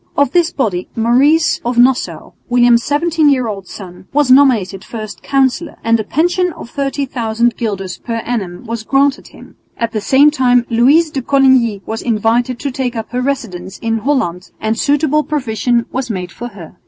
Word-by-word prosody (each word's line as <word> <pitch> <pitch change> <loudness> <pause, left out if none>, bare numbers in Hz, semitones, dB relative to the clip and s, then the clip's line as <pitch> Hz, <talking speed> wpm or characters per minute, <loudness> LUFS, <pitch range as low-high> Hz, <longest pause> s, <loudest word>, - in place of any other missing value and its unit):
Of 285 -3 +2
this 350 +1 +2
body 205 - -2
Maurice 270 +8 +3
of 240 0 -2
Nassau, 250 +1 +1 0.2
William's 240 -1 +4
seventeen 310 +1 +1
year 260 -3 +2
old 195 -3 -6
son, 185 -2 -11
was 285 -2 +2
nominated 235 -9 +3
first 215 -5 -8
Councillor, 275 +4 0
and 230 0 +2
a - - -1
pension 355 - 0
of 235 - -11
30,000 240 -5 -1
guilders 195 -5 -4
per 230 - -5
annum 195 -5 -4
was 230 0 -4
granted 275 +4 +1
him. - - -16 0.2
At 230 -1 -2
the 215 -2 -3
same 275 +6 +4
time 250 -4 +2
Louise 285 +8 +4
de 270 - -3
Coligny 255 -6 +2
was 220 0 -4
invited 235 +2 0
to 280 - -2
take 255 -1 -3
up 225 -1 -5
her 250 0 -2
residence 195 -9 -4
in 225 -1 -2
Holland 215 -9 -1
and 220 +1 -1
suitable 295 +4 +1
provision 240 -5 -1
was 260 -1 -3
made 180 -4 -4
for 240 - -7
her. 195 -8 -12
245 Hz, 175 wpm, -15 LUFS, 220-275 Hz, 0.2 s, William's